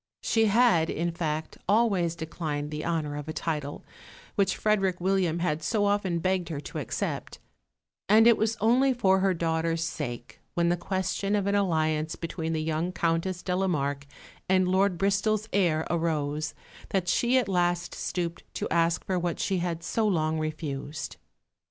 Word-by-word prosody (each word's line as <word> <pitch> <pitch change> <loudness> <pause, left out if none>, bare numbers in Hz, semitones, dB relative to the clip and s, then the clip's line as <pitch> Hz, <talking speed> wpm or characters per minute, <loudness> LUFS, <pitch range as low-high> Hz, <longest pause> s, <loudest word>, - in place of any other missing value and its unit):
She 225 -1 +3
had, 210 -7 +4
in 170 +2 -1
fact, 160 -2 -3
always 200 -6 +3
declined 155 -3 -4
the 150 0 -4
honour 155 -3 -1
of 145 0 -6
a - - -3
title, 150 -4 -3 0.5
which 195 -2 +1
Frederick 195 -4 +1
William 185 -2 +1
had 160 -3 -1
so 205 +6 +1
often 200 -4 +1
begged 185 0 0
her 155 -4 -3
to 145 - -6
accept; - - -3 0.7
and 220 +2 +7
it 235 -1 +7
was 220 +2 0
only 255 +5 +3
for 190 -5 +3
her 190 -1 +2
daughter's 165 0 0
sake, 125 -7 -5 0.2
when 170 0 +2
the 175 - +3
question 190 +3 -1
of 200 -2 0
an 200 - +1
alliance 160 -5 +1
between 165 -1 -4
the 155 -1 -1
young 160 +3 -1
Countess 170 +1 -1
de 180 - -1
la 190 +1 +1
Marke 140 -4 -1 0.4
and 185 -1 +4
Lord 190 0 +2
Bristol's 200 +3 +1
heir 170 -5 +2
arose, 155 -2 -1 0.3
that 190 -2 0
she 240 +7 +3
at 250 -5 +2
last 175 -2 0
stooped 175 -2 -3
to - - -2
ask 170 0 +1
for 185 -1 0
what 175 -1 -2
she 190 -2 0
had 170 -1 -3
so 220 +6 0
long 160 -4 +1
refused. 155 -1 -4
175 Hz, 170 wpm, -27 LUFS, 160-195 Hz, 0.7 s, and